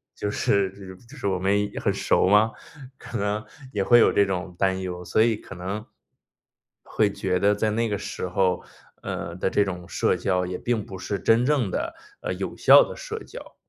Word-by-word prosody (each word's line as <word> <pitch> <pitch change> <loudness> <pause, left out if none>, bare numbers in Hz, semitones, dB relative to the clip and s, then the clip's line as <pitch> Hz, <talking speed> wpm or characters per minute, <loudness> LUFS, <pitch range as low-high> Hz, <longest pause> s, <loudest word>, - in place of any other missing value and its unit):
就 105 - -3
是 100 -2 +1 0.4
就 150 - -13
是 125 - -3
我 95 -2 0
们 100 +2 +1
很 - - +2
熟 - - +2
吗？ 105 +3 +5 0.5
可 - - -6
能 105 +1 -1 0.3
也 100 -2 0
会 120 +3 +6
有 - - +5
这 100 - +5
种 90 -2 -4
担 95 -1 +1
忧， 90 -1 -5
所 90 - -1
以 115 -1 +3
可 95 - -11
能 95 +5 -5 1.0
会 105 -2 +1
觉 95 -2 -1
得 100 +2 +3
在 105 +1 0
那 115 +1 0
个 100 - -1
时 90 - -5
候， 90 0 +1 0.4
呃， 85 - -5
的 95 - -1
这 105 - +2
种 90 -3 -6
社 - - +1
交 90 -2 0
也 90 0 -4
并 115 -4 -1
不 95 - -8
是 100 +1 -3
真 115 +2 +3
正 135 -8 +2
地， 330 - -3 0.3
呃， - - -2
有 - - -5
效 - - +7
的 - - -8
社 - - -6
交。 - - -11
100 Hz, 215 characters per minute, -25 LUFS, 95-110 Hz, 1.0 s, 效